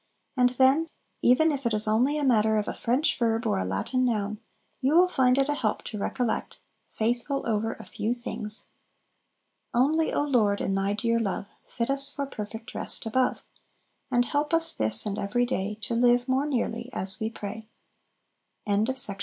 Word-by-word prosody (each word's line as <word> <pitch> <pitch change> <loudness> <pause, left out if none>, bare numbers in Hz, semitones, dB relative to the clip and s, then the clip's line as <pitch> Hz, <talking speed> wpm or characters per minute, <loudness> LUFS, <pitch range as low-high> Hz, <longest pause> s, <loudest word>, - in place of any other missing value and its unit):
And 250 -1 +4
then, 270 +6 +4 0.3
even 310 +6 +4
if 280 -2 -3
it 225 - 0
is 210 +1 +2
only 250 +8 +2
a 295 - -1
matter 220 -4 +3
of 210 - -1
a - - -2
French 255 +7 0
verb 230 -1 +1
or 95 - +1
a 95 - -1
Latin 100 - -1
noun, 215 -3 -1 0.4
you 275 +4 +2
will 360 +2 +6
find 260 -7 +2
it 275 0 +3
a 295 - +1
help 225 -7 -1
to 210 - -6
recollect, 235 +3 -2 0.3
"Faithful 240 +5 -1
over 225 0 0
a - - -12
few 225 +3 -2
things!" 220 -3 -6 1.1
"Only, 310 +6 +2
O - - +1
Lord, 220 -8 +2
in 195 - -1
Thy 195 +1 0
dear 230 +2 0
love 200 -2 -3 0.2
Fit 235 +2 -2
us 275 0 +2
for 280 -1 -3
perfect 220 -2 -7
rest - - -2
above; 255 +3 0 0.7
And 245 -2 +2
help 295 +5 0
us, 330 0 +3
this 110 0 +1
and 205 -1 -3
every 215 +5 0
day, 210 -4 -2
To 240 +1 -4
live 245 +1 +3
more 265 +3 +1
nearly 235 -3 -2
as 190 +1 -2
we 220 - -1
pray." 220 0 -7 1.0
8. 205 +3 +1
Eighth 265 -1 +3
Day. 200 - -5
235 Hz, 185 wpm, -27 LUFS, 215-265 Hz, 1.1 s, will